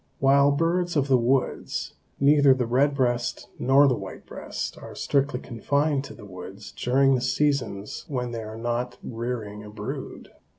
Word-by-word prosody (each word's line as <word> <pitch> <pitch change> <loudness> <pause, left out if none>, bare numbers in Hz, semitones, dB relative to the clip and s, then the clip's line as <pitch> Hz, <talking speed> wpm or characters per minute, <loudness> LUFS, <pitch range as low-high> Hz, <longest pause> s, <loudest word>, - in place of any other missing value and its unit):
While 140 +1 +5
birds 170 +4 +1
of 140 -2 +1
the 130 - +6
woods, 125 +3 0 0.3
neither 140 -1 +6
the 125 -2 0
red 135 +5 +2
breast 120 -3 -1
nor 135 +3 +5
the 130 - +3
white 95 -5 -7
breast - - -5
are - - -10
strictly 140 -2 0
confined 140 +5 0
to - - -10
the - - -12
woods 95 +2 -9
during 135 +2 +3
the 125 - +1
seasons 125 -6 -1
when 125 -4 -3
they 115 -1 -4
are 110 0 -7
not 120 +1 -2
rearing 115 -3 -4
a 105 - -10
brood. 105 - -7
125 Hz, 165 wpm, -25 LUFS, 115-140 Hz, 0.3 s, the